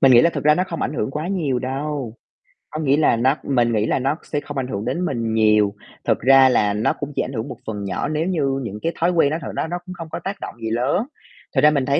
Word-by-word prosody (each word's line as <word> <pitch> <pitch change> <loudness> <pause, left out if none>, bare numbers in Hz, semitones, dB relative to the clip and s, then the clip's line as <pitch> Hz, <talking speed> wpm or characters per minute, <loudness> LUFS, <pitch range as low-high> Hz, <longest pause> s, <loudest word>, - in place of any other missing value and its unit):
Mình 135 -1 +6
nghĩ 120 - +8
là 170 - +4
thực - - -5
ra 150 0 +6
nó 180 +3 +1
không 165 - -4
ảnh - - -2
hưởng 110 -1 -1
quá 150 +4 -4
nhiều 155 -10 0
đâu, 135 -1 -3 0.6
có 155 - -5
nghĩa 140 -1 +3
là 155 - +4
nó 130 +5 +2
mình 120 -4 +1
nghĩ 105 -1 +1
là - - +1
nó 135 +3 0
sẽ 145 - -2
không 145 -1 -8
ảnh 130 -2 -1
hưởng 100 -4 -4
đến 180 +1 -1
mình 115 -6 -2
nhiều, 105 -2 +4 0.3
thực - - +2
ra 135 +1 +6
là 105 -5 +2
nó 105 +2 +1
cũng 145 0 -6
chỉ - - +1
ảnh 130 - -4
hưởng 110 -2 -3
một - - -7
phần 105 -2 -4
nhỏ 95 -2 -2
nếu 155 +2 -1
như 140 -7 0
những 105 -2 -5
cái 165 - 0
thói 170 +2 +3
quen 165 -5 +3
nó 155 - -1
thật 140 - -5
đó - - -1
nó 175 +2 -3
cũng 185 - -7
không 165 -2 -8
có - - -3
tác 195 +1 -5
động - - -6
gì 110 - -2
lớn. 130 - +1 0.5
Thật 130 - +4
ra 150 +1 +7
mình 140 -3 +1
thấy 140 +1 +2
135 Hz, 295 wpm, -21 LUFS, 115-155 Hz, 0.6 s, nghĩ